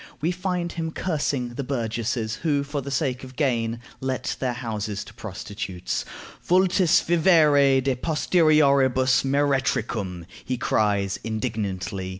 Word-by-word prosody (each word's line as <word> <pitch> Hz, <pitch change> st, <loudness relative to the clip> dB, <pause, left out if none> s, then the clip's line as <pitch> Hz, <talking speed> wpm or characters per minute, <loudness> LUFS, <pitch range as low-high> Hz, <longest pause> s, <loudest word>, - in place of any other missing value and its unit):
We 165 Hz, +4 st, 0 dB
find 180 Hz, -1 st, -2 dB
him 165 Hz, -1 st, -3 dB
cursing 145 Hz, -7 st, -2 dB
the 120 Hz, +4 st, -5 dB
"burgesses" 115 Hz, -3 st, -2 dB
who, 145 Hz, -4 st, 0 dB
for 145 Hz, 0 st, -4 dB
the 140 Hz, -, -6 dB
sake 135 Hz, -2 st, -1 dB
of 130 Hz, 0 st, -10 dB
gain, 120 Hz, -5 st, 0 dB, 0.2 s
let 130 Hz, -1 st, -2 dB
their 125 Hz, -2 st, -1 dB
houses 105 Hz, -4 st, -4 dB
to -, -, -14 dB
prostitutes: 100 Hz, -3 st, -5 dB, 0.4 s
"Vultis 185 Hz, -1 st, +3 dB
vivere 150 Hz, -6 st, +4 dB
de 135 Hz, 0 st, 0 dB
posterioribus 140 Hz, -4 st, +3 dB
meretricum," 130 Hz, -10 st, 0 dB, 0.2 s
he 130 Hz, -, -2 dB
cries, 100 Hz, -4 st, 0 dB
indignantly. 105 Hz, -4 st, -3 dB
130 Hz, 125 wpm, -24 LUFS, 110-150 Hz, 0.4 s, vivere